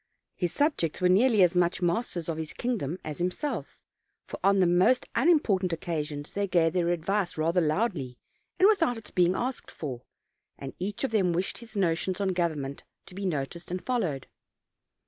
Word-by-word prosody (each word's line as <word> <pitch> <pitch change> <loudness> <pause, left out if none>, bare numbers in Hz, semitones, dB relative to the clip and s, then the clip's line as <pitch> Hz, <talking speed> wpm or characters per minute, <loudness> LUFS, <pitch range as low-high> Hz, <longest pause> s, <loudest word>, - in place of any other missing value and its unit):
His 175 -3 -1
subjects 285 - 0
were 180 -1 +3
nearly 215 +2 +5
as 180 0 +3
much 175 0 +2
masters 175 -1 -1
of 165 -2 -2
his 160 -1 -5
kingdom 200 - -2
as 155 0 -6
himself, 180 - -3 0.5
for - - -8
on 195 0 +4
the 185 - +5
most 180 +9 +3
unimportant 220 - +3
occasions 150 -3 -4
they 200 0 -1
gave 170 -3 +2
their 175 -2 +1
advice 175 +2 0
ratner 165 +1 +1
loudly 155 - -1 0.4
and 380 - +6
with 420 -3 +3
out 245 -7 +2
its 225 - -10
being 180 0 +3
asked 255 +3 -3
for; 130 -6 -6 0.6
and 135 -1 -7
each 200 +6 -4
of 270 - 0
them 190 -6 +2
wished 180 +3 -2
his 235 -2 -13
notions 185 0 0
on 200 -1 +1
government 155 -6 -2 0.2
to - - -12
be 195 +1 -3
noticed 165 +1 -3
and 180 +1 -4
followed. 180 - -1
180 Hz, 180 wpm, -28 LUFS, 165-205 Hz, 0.6 s, and